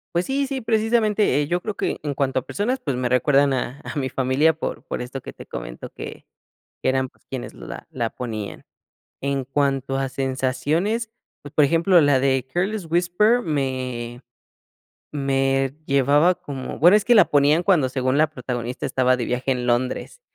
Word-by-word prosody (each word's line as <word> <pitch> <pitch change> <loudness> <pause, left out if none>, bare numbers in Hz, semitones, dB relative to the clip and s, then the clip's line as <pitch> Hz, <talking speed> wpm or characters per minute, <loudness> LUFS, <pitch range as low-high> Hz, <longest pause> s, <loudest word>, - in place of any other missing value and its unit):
Pues 175 - +2
sí, 275 +1 0
sí, 265 -1 -3
precisamente, 220 - +2
eh, 145 - -2
yo 175 +3 0
creo 215 -2 -4
que - - -2
en 145 -1 -3
cuanto 135 -1 0
a - - -12
personas, 245 +6 -1
pues 140 - -2
me 125 0 -1
recuerdan 140 +2 +3
a 130 +2 -3
a - - -7
mi 130 -1 -2
familia, 135 +5 +2
por 160 - -5
por - - -4
esto 125 +2 -6
que - - -9
te - - -11
comento, - - -7
que - - -9 0.6
que - - +1
eran, 130 0 +1
pues, - - -32
quienes 130 -2 -6
la - - -9
la 115 -1 -2
ponían. 110 -5 -6 0.6
En 140 -1 -1
cuanto 135 0 0
a 135 0 -1
sensaciones, 135 - -1 0.3
pues, 145 - -11
por 150 - +5
ejemplo, 170 +4 +4
la 145 -3 +4
de 130 -1 +1
Careless 190 +1 -1
Whisper 180 +8 +3
me 130 -4 -3 0.9
me 135 -1 +1
llevaba 145 +5 +4
como 135 -5 -7
bueno, 175 +6 +7
es 210 - -3
que 240 - +5
la 205 - +8
ponían 145 +4 +4
cuando, 170 -9 +3
según 130 +1 0
la 155 0 +4
protagonista, 125 -3 -4
estaba 130 -1 +2
de 120 - -2
viaje 125 +2 -1
en 125 -1 -1
Londres. 125 - -1
140 Hz, 185 wpm, -23 LUFS, 130-175 Hz, 0.9 s, la